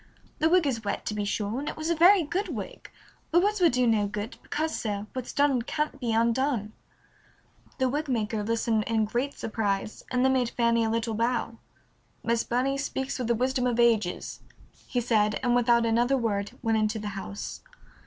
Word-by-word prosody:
The 320 - +3
wig 360 -1 +4
is 240 -5 -1
wet, 200 - -3
to - - -2
be 205 -1 -2
sure, 210 +3 -2
and 290 - -3
it - - -7
was 315 +2 -2
a - - +2
very 355 +3 +6
good 365 +7 -2
wig, - - -7 0.4
but 345 +2 +4
words 415 -1 +1
will 345 - +6
do 250 0 +2
no 215 -3 +2
good, 210 +3 -5
because, 315 +1 -2
sir, 205 -2 -3
what's 255 -2 -5
done 280 -3 +2
can't 300 +3 -3
be 240 -3 -1
undone." 230 -1 +1 1.0
The 260 - +2
wig 295 +4 -2
maker 220 -3 -1
listened 225 0 0
in 220 -1 +2
great 245 +6 -2
surprise, 210 -2 -2
and 250 0 +1
then 265 - +4
made 250 -2 +1
Fanny 235 -1 +2
a 225 - 0
little 225 0 -1
bow. 230 0 -1 0.6
"Miss 230 0 +1
Burney 265 +3 0
speaks 265 -1 -3
with 245 - -2
the 235 - +2
wisdom 255 +1 0
of 240 -1 -1
ages," 225 -6 +1 0.5
he 245 - -1
said, 215 -3 +2
and 245 -1 +2
without 235 -1 +4
another 240 +4 +2
word 205 -4 -1
went 225 -1 +2
into 215 +1 0
the 210 -1 -4
house. 100 - -6
235 Hz, 195 wpm, -27 LUFS, 220-265 Hz, 1.0 s, very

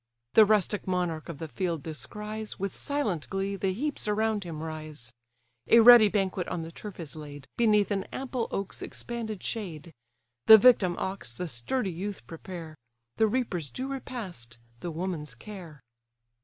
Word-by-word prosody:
The 220 - +8
rustic 210 -1 +1
monarch 175 -3 -1
of 165 - -6
the 160 - -5
field 170 -2 -2
descries, 210 +7 -6
With 195 0 -3
silent 225 - -2
glee, 195 +1 -2
the 195 -1 0
heaps 275 +5 -2
around 215 0 +1
him 160 -2 -6
rise. 155 -7 -7 0.5
A 230 - +7
ready 235 -1 +10
banquet 195 -3 -1
on 165 - -3
the 165 - -8
turf 205 +2 -9
is 160 -3 -7
laid, 145 -3 -9
Beneath 210 -3 +3
an 195 -1 0
ample 255 -3 -3
oak's 195 -1 -4
expanded 225 -4 -5
shade. 170 -7 -5 0.5
The 220 - +12
victim 205 -6 +5
ox 190 -11 -3
the 175 +9 -5
sturdy 175 - -2
youth 195 +4 -5
prepare; 165 -2 -9 0.4
The 220 - +4
reaper's 205 - -1
due 260 - -5
repast, 190 - -6 0.2
the 175 - -4
woman's 160 -6 -4
care. 170 - -10
190 Hz, 155 wpm, -28 LUFS, 160-215 Hz, 0.5 s, The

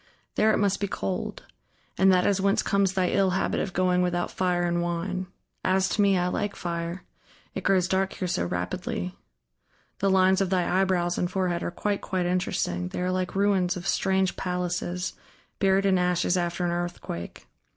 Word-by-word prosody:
There 220 - +3
it - - +2
must 200 -1 +1
be 200 - -1
cold... 95 - -4 0.5
and 190 +1 +5
that 180 -1 +3
is 200 -1 +2
whence 200 0 +2
comes 200 -1 +2
thy 185 -2 +1
ill 195 -1 +3
habit - - 0
of 195 - -2
going 180 0 +2
without 175 -1 0
fire 180 -1 0
and 175 0 +1
wine. 180 +2 -2 0.4
As 190 0 +2
to 210 - +1
me, 200 -2 +4
I 180 - +1
like 200 +3 -2
fire; 170 +1 -4 0.5
it - - -5
grows 185 -2 +3
dark 190 0 0
here 185 - -3
so 90 - 0
rapidly.... 90 0 -3 0.8
The 195 - +2
lines 190 0 +4
of 195 - +1
thy 185 0 +2
eyebrows 175 -2 +1
and 175 - 0
forehead 180 -3 -1
are - - -2
quite, 200 +3 -2
quite 185 -2 -1
interesting: 130 - -1
they - - -5
are 180 - 0
like 185 0 -2
ruins 195 -2 +2
of 175 +1 -6
strange 190 -1 +1
palaces, 180 0 -2 0.5
buried 195 -1 +3
in 190 -2 +3
ashes 180 0 +1
after 175 0 -1
an 175 - 0
earthquake. 175 - -5
185 Hz, 185 wpm, -26 LUFS, 175-190 Hz, 0.8 s, and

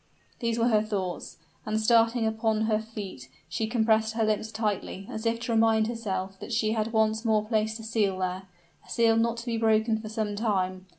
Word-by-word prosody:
These 230 -2 -1
were 235 +1 +3
her 215 -2 +4
thoughts: 195 -5 -4 0.3
and 215 0 -1
starting 230 +1 +3
upon 220 0 0
her 220 -1 +2
feet, 205 - -8 0.2
she 165 +8 -2
compressed 220 -1 +2
her 225 - +1
lips 215 0 0
tightly, 210 -3 -3
as 220 +1 -3
if 230 0 0
to 240 - -3
remind 225 -1 +4
herself 195 -4 -4
that - - -8
she 220 -2 +1
had 220 0 -1
once 220 0 +2
more 215 -2 +2
placed 220 0 0
a - - -9
seal 215 -4 0
there, 185 +1 -3 0.4
a - - -21
seal 230 -1 +3
not 230 +1 +1
to 235 - -7
be 235 -2 -1
broken 220 0 +2
for 215 -1 -7
some 215 -1 -2
time. 190 -4 -1
220 Hz, 200 wpm, -27 LUFS, 210-225 Hz, 0.4 s, her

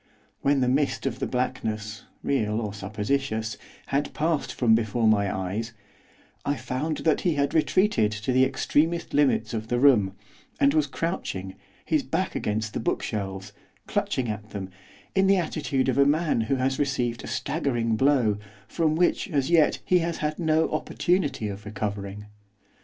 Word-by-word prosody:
When 140 -1 +2
the 125 - +2
mist 135 +3 +1
of 135 - -2
the - - -1
blackness 110 -4 -3 0.2
real 110 -5 0
or 105 -3 -3
supposititious 110 +2 -2 0.3
had 140 +2 -1
passed 160 -1 0
from 115 -3 +3
before 115 +1 +1
my 100 -3 +3
eyes, 100 +5 -3 0.7
I 145 - 0
found 150 +4 -3
that 160 - +3
he 170 -4 +1
had 140 -1 0
retreated 160 - +3
to 105 +4 -2
the 130 +1 +4
extremest 155 +5 +1
limits 135 -6 +2
of 110 -1 -3
the 120 - 0
room, 115 -8 +4 0.4
and 140 0 +4
was 155 -2 +2
crouching, 130 - -3 0.3
his - - +2
back - - -2
against 110 +1 -2
the - - -2
bookshelves, 100 -3 -3 0.3
clutching 130 -2 -1
at 105 0 -5
them, 95 -2 -6 0.4
in 190 0 +3
the 195 0 +5
attitude 150 -6 -1
of 130 +1 +1
a - - +8
man 155 -4 +2
who 110 +5 0
has 130 0 0
received 125 -4 -1
a - - -7
staggering 125 -7 -1
blow, 120 -5 +3 0.3
from 160 -2 +1
which, 175 +3 +1
as 140 -3 0
yet, 160 -3 +4
he 180 - +4
has 170 0 -2
had 155 +1 -2
no 160 -1 +2
opportunity 155 - 0
of 100 0 -6
recovering. 105 -1 -4
130 Hz, 165 wpm, -26 LUFS, 110-150 Hz, 0.7 s, a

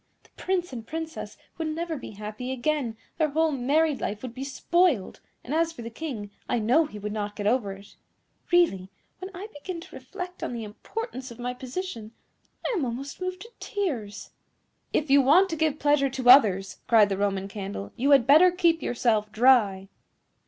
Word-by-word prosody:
The - - -25
Prince 360 -5 -2
and 230 -2 -7
Princess 320 0 -6 0.2
would 320 - -1
never 325 +1 -3
be 260 - -8
happy 215 +5 -6
again, 260 -3 -1 0.2
their 310 -1 +3
whole 320 +2 +2
married 285 +2 +1
life 205 +2 -3
would 250 -2 -6
be 260 - -6
spoiled; 285 - +1 0.2
and 265 - -5
as 330 +1 +2
for 240 -8 -9
the 230 - -7
King, 225 -7 -6 0.2
I - - +1
know 250 +9 +3
he 210 - -10
would 210 0 -5
not 205 -1 -4
get 205 - -5
over 215 -2 +1
it. 200 +1 -15 0.5
Really, 260 - +3 0.3
when 375 +1 -6
I 385 +4 -6
begin 335 +4 -6
to 330 - -12
reflect 365 -2 -8
on - - -3
the 235 -1 -4
importance 260 - -6
of 235 - -11
my 245 0 -3
position, 250 - -6 0.5
I - - 0
am 340 - 0
almost 265 +6 -5
moved 370 0 -4
to 460 - -11
tears." 275 - -4 0.6
"If 300 -2 0
you 280 0 +7
want 330 +9 +5
to - - -1
give 310 -2 0
pleasure 290 -2 +2
to 260 -1 0
others," 195 -8 +5
cried 220 -3 +5
the 195 - -1
Roman 195 -1 -1
Candle, 195 - -6
"you 270 +4 0
had 275 -5 +6
better 310 +7 +7
keep 345 -2 +2
yourself 220 -3 0
dry." 215 -5 +4
260 Hz, 190 wpm, -26 LUFS, 215-325 Hz, 0.6 s, you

